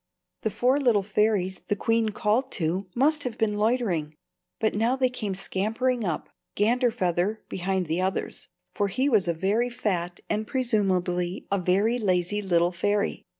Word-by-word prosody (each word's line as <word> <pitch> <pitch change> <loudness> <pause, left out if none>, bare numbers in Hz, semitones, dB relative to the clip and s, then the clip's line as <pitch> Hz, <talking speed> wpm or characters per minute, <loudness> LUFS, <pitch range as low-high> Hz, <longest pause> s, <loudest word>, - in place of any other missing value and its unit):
The 220 - 0
four 255 +6 +2
little 235 -7 +3
fairies 195 -2 +1
the 205 - +1
queen 225 +1 +1
called 220 +5 0
to 185 +2 -1
must 300 +4 +2
have 250 -3 -4
been 220 -2 +1
loitering. 205 -10 0 0.4
But 220 - +1
now 230 +5 +1
they 260 -1 +1
came 210 -6 -3
scampering 225 +6 -1
up, 170 -6 -2 0.3
Ganderfeather 210 -4 +1
behind 190 0 -1
the 165 +3 -1
others, 190 +1 -2 0.3
for 205 - 0
he 255 +8 0
was 215 -8 +3
a 170 - +2
very 210 +8 +1
fat 180 -8 -2
and 215 0 -1
presumably 185 -7 0
a 200 - +2
very 200 +7 +2
lazy 185 0 +1
little 175 -3 +2
fairy. 205 +3 -1
205 Hz, 155 wpm, -26 LUFS, 185-230 Hz, 0.4 s, little